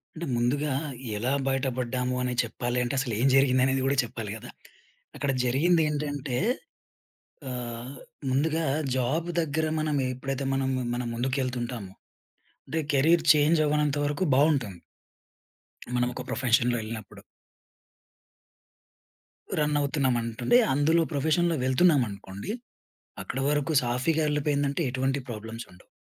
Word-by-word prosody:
అంటే 165 +1 -4
ముందుగా 140 +5 0 0.5
ఎలా 120 +5 -1 0.2
బయట 135 0 0
పడ్డాము 125 0 -1
అనేది 125 -1 -1
చెప్పాలి 120 +2 -3
అంటే 120 - -2
అసలు 130 -4 -2
ఏం 130 - +3
జరిగింది 130 -1 +4
అనేది 135 0 +1
కూడా 140 +1 +1
చెప్పాలి 115 -3 -6
కదా, - - -11 0.7
అక్కడ 140 -1 -1
జరిగింది 160 +8 +3
ఏంటంటే, 145 -3 -2 1.1
ఆహ్, 120 0 -5 0.4
ముందుగా 155 +5 +1 0.3
జాబ్ 145 +7 0
దగ్గర 160 0 0
మనం 155 -1 0 0.2
ఎప్పుడైతే 135 +1 -3
మనం, 135 0 0 0.2
మనం 125 0 -3
ముందుకు 130 +3 -1
ఎళ్తుంటామో 120 -5 -4 0.7
అంటే 165 - -2
కెరీర్ 160 +4 +4
చేంజ్ 150 +2 +4
అవ్వనంత 150 -1 +1
వరకు 145 +6 -1
బాగుంటాము... 135 - +2 1.2
మనం 125 0 +2
ఒక 125 - -5
ప్రొఫెషన్‌లో 120 -1 +2
ఎళ్ళినప్పుడు. 110 -1 -8 2.4
రన్ 150 0 +1
అవుతున్నాం 140 -3 +1
అనటుండే 115 - +2 0.2
అందులో 155 +4 +3
ప్రొఫెషన్‌లో 160 +4 +1
వెళ్తున్నాం 140 +3 +4
అనుకోండి. 100 - -7 0.7
అక్కడ 130 - -4
వరకు 150 +2 0
సాఫీగా 130 +7 +1
ఎళ్లిపోయిందంటే 145 0 0
ఎటువంటి 130 +2 0
ప్రాబ్లమ్స్ 115 0 -6
ఉండవు. 90 0 -19
135 Hz, 120 wpm, -27 LUFS, 120-150 Hz, 2.4 s, జరిగింది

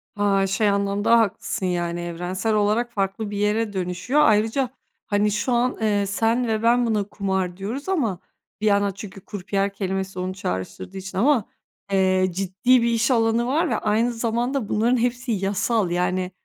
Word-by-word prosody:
Ha, 200 -1 +2
şey 205 +2 +1
anlamda 200 +3 +2
haklısın. 210 -1 -1
Yani 175 -1 -1
evrensel 180 +5 -2
olarak 215 +3 +1
farklı 200 +1 -2
bir 205 - -4
yere 210 +1 0
dönüşüyor. 185 +10 0
Ayrıca, 225 +3 +2 0.4
hani, 205 0 +1
şu 210 +5 -1
an, 245 +1 +1
eee, 205 -2 +1
sen 225 +5 +1
ve 220 0 -1
ben 240 +1 +4
buna 215 -3 +1
"kumar" 190 -3 -2
diyoruz 240 - -5
ama 230 - 0 0.4
bir - - -1
yana 200 -1 +2
çünkü 195 -1 -9
krupiye 200 0 -2
kelimesi 190 -1 -3
onu 185 +1 -3
çağrıştırdığı 95 - -5
için 190 0 -7
ama, 245 -1 +3 0.5
eee, 185 -1 +3
ciddi 195 +7 +2
bir 235 - +2
iş 230 +2 +1
alanı 230 0 +2
var 320 +5 +1
ve - - +1
aynı 225 +3 +1
zamanda 235 +1 -1
bunların 235 +4 +2
hepsi 245 +1 -1
yasal. 200 0 0
Yani 180 +1 0
205 Hz, 165 wpm, -23 LUFS, 190-230 Hz, 0.5 s, ben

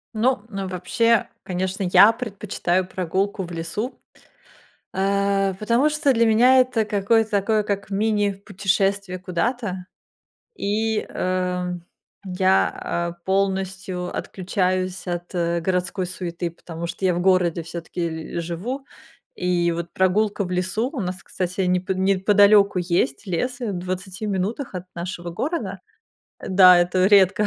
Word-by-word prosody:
Ну 235 0 +1
ну 195 -2 -4
вообще, 205 +5 +1 0.2
конечно, 185 +1 -3
я 210 +4 +8
предпочитаю 200 -5 -2
прогулку 190 +2 -2
в 175 - -8
лесу, 170 +9 -4 0.9
а, 195 0 +1
потому 235 +9 +2
что 300 -2 +2
для 230 -2 +3
меня 245 +4 +6
это 250 -3 +1
какое-то 215 +2 +1
такое 210 +1 +2
как 200 -1 -3
мини-путешествие 200 -2 0
куда-то. 185 +1 -2 0.7
И, 215 +2 -1
э, 180 0 -1 0.6
я, 185 +1 +2
а, 170 0 -2
полностью 190 -1 -1
отключаюсь 185 0 -2
от, 175 +1 -5
э, 170 0 0
городской 180 +2 -1
суеты, 175 -1 -4
потому 165 0 -7
что 190 +2 -3
я 180 - +2
в 175 - -1
городе 180 -2 +2
всё-таки 165 -1 -5
л - - 0
живу. 210 +12 -4 0.5
И 175 -1 +1
вот 170 0 -5
прогулка 200 +2 +1
в 180 - -6
лесу 185 +7 -1
У 275 - -4
нас, 180 -2 -4
кстати, 185 +2 -3
непо 180 0 0
неподалеку 200 +1 +4
есть 170 -2 0
лес, 245 +8 -2
в 230 -4 -2
20 185 +2 -5
минутах 205 +6 -2
от 180 0 -5
нашего 175 0 -5
города 305 - -3 0.7
Да, 185 -1 +8
это 180 +1 +2
редко, 200 +1 +5
190 Hz, 130 wpm, -23 LUFS, 180-210 Hz, 0.9 s, я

